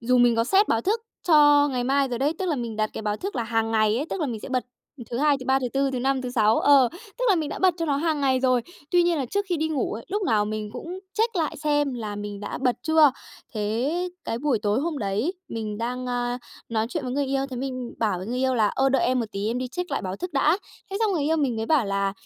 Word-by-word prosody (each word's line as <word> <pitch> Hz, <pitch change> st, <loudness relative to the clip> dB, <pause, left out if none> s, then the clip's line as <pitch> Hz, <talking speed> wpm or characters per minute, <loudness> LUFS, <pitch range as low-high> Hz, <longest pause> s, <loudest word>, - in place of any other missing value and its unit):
dù 250 Hz, +2 st, +2 dB
mình 240 Hz, -1 st, +5 dB
có 230 Hz, -, +3 dB
set 390 Hz, -, +3 dB
báo 225 Hz, -, +2 dB
thức 425 Hz, -, 0 dB, 0.3 s
cho 290 Hz, -2 st, +6 dB
ngày 250 Hz, -3 st, -1 dB
mai 275 Hz, +1 st, +2 dB
rồi 240 Hz, -2 st, -3 dB
đấy, 280 Hz, +4 st, +1 dB
tức 380 Hz, -, -2 dB
là 320 Hz, -4 st, 0 dB
mình 235 Hz, -3 st, -4 dB
đặt 215 Hz, 0 st, 0 dB
cái -, -, -6 dB
báo 210 Hz, -1 st, -1 dB
thức 390 Hz, -, -5 dB
là 240 Hz, -, 0 dB
hàng 225 Hz, -1 st, 0 dB
ngày 215 Hz, -1 st, +3 dB
ấy, 285 Hz, +5 st, -2 dB
tức -, -, -3 dB
là 305 Hz, -, +1 dB
mình 230 Hz, -5 st, -4 dB
sẽ -, -, -8 dB
bật 255 Hz, -1 st, -1 dB, 0.5 s
thứ 235 Hz, -, -2 dB
Hai, 290 Hz, 0 st, +3 dB
thứ 255 Hz, -, -9 dB
Ba, 265 Hz, +1 st, +4 dB
thứ 255 Hz, -2 st, -2 dB
Tư, 275 Hz, 0 st, +1 dB
thứ 260 Hz, -, -2 dB
Năm, 265 Hz, +1 st, 0 dB
thứ 250 Hz, -, -4 dB
Sáu. 220 Hz, -3 st, +3 dB
Ờ, 275 Hz, -3 st, +6 dB, 0.3 s
tức -, -, -1 dB
là 405 Hz, -, +6 dB
mình 315 Hz, -4 st, -1 dB
đã -, -, -5 dB
bật 370 Hz, -2 st, +3 dB
cho 330 Hz, -, -1 dB
nó 285 Hz, -2 st, +1 dB
hàng 310 Hz, 0 st, 0 dB
ngày 260 Hz, -2 st, +2 dB
rồi. 255 Hz, -2 st, +2 dB, 0.3 s
Tuy 350 Hz, 0 st, +5 dB
nhiên 345 Hz, -2 st, +2 dB
là 270 Hz, -, -1 dB
trước 405 Hz, +9 st, -1 dB
khi 355 Hz, -, +1 dB
đi 315 Hz, 0 st, -1 dB
ngủ 295 Hz, -6 st, -1 dB
ấy, 225 Hz, +2 st, -6 dB
lúc 410 Hz, +2 st, -1 dB
nào 215 Hz, -, +2 dB
mình 215 Hz, 0 st, -4 dB
cũng 335 Hz, +9 st, -6 dB, 0.2 s
check 455 Hz, -1 st, +1 dB
lại 320 Hz, -3 st, -1 dB
xem 290 Hz, -3 st, 0 dB
là 215 Hz, -4 st, -5 dB
mình 205 Hz, -1 st, -6 dB
đã 205 Hz, -, -5 dB
bật 250 Hz, -2 st, +1 dB
chưa. 315 Hz, -2 st, +5 dB, 0.4 s
Thế 245 Hz, +12 st, -1 dB, 0.2 s
cái 230 Hz, -, -2 dB
buổi 275 Hz, -3 st, +1 dB
tối 210 Hz, +3 st, +1 dB
hôm 315 Hz, -1 st, -2 dB
đấy 215 Hz, -, -1 dB
mình 215 Hz, -2 st, -4 dB
đang, 250 Hz, +2 st, -3 dB
a, 245 Hz, 0 st, -1 dB, 0.3 s
nói 220 Hz, -1 st, 0 dB
chuyện 295 Hz, +2 st, -3 dB
với 250 Hz, -, -3 dB
người 280 Hz, +1 st, 0 dB
yêu, 270 Hz, 0 st, 0 dB
thế 255 Hz, -, -5 dB
mình 255 Hz, -1 st, -4 dB
bảo 210 Hz, -5 st, 0 dB
với 185 Hz, -, -6 dB
người 245 Hz, +3 st, -2 dB
yêu 260 Hz, 0 st, +1 dB
là 220 Hz, -3 st, +3 dB
"Ơ, 270 Hz, +5 st, +1 dB
đợi 270 Hz, -1 st, +2 dB
em 255 Hz, 0 st, +2 dB
một 230 Hz, -, -2 dB
tí, 200 Hz, +1 st, -3 dB
em 235 Hz, +3 st, -1 dB
đi 255 Hz, 0 st, -3 dB
check 355 Hz, +6 st, -5 dB
lại 280 Hz, -, -1 dB
báo 185 Hz, 0 st, -4 dB
thức 360 Hz, -, -5 dB
đã." 300 Hz, +5 st, +3 dB, 0.3 s
Thế 390 Hz, -, -2 dB
xong 435 Hz, -3 st, +2 dB
người 325 Hz, -5 st, 0 dB
yêu 315 Hz, +3 st, +2 dB
mình 275 Hz, -7 st, 0 dB
mới 220 Hz, 0 st, -2 dB
bảo 295 Hz, -4 st, +3 dB
là 195 Hz, 0 st, 0 dB
255 Hz, 295 wpm, -25 LUFS, 230-300 Hz, 0.5 s, cho